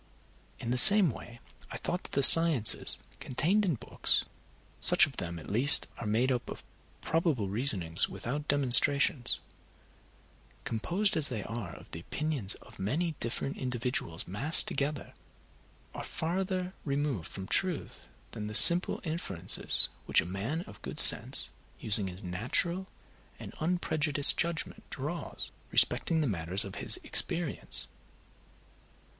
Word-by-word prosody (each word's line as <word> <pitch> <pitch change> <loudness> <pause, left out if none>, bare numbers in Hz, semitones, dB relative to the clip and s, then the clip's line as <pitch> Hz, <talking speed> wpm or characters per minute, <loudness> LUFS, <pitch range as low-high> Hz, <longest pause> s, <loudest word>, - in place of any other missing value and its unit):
In 115 - -6
the 125 - +2
same 195 +2 +7
way 120 +1 -13 0.3
I - - -8
thought 180 - -5
that - - -11
the 140 - 0
sciences 160 -8 +5 0.2
contained 175 +11 -2
in 175 -7 -1
books - - -2 0.5
(such - - +4
of 135 - -13
them 85 -2 -6
at 80 - -12
least 125 +8 +4
as - - -11
are 115 - -6
made 120 +5 -1
up 125 -2 -4
of - - -10 0.4
probable 155 - -2
reasonings, 100 -7 -1
without 145 +4 -7
demonstrations), 140 -1 +3 1.3
composed 180 - -1
as 155 -3 +6
they 110 -6 -6
are 110 -7 -8
of - - -17
the 80 - -7
opinions 135 - -4
of - - -19
many 155 - -3
different 120 +4 -6
individuals 125 -9 -4
massed 135 - +3
together, 145 +1 -5 0.8
are - - -8
farther 185 +2 -5
removed 140 - -4
from 95 - -10
truth 180 - -4 0.2
than 105 -2 -8
the 105 - -6
simple 170 - +8
inferences 155 - -1 0.2
which - - +2
a - - -3
man 100 - -5
of 105 - -15
good - - -9
sense - - +4 0.3
using 105 -2 +1
his 90 +1 -10
natural 130 - -1 0.5
and - - -11
unprejudiced 155 -4 +1
judgment 170 -1 -4
draws 150 +6 -7 0.2
respecting 160 -1 +1
the - - -1
matters 95 -1 0
of 100 - -10
his - - +1
experience. 170 -4 0
135 Hz, 140 wpm, -28 LUFS, 105-165 Hz, 1.3 s, simple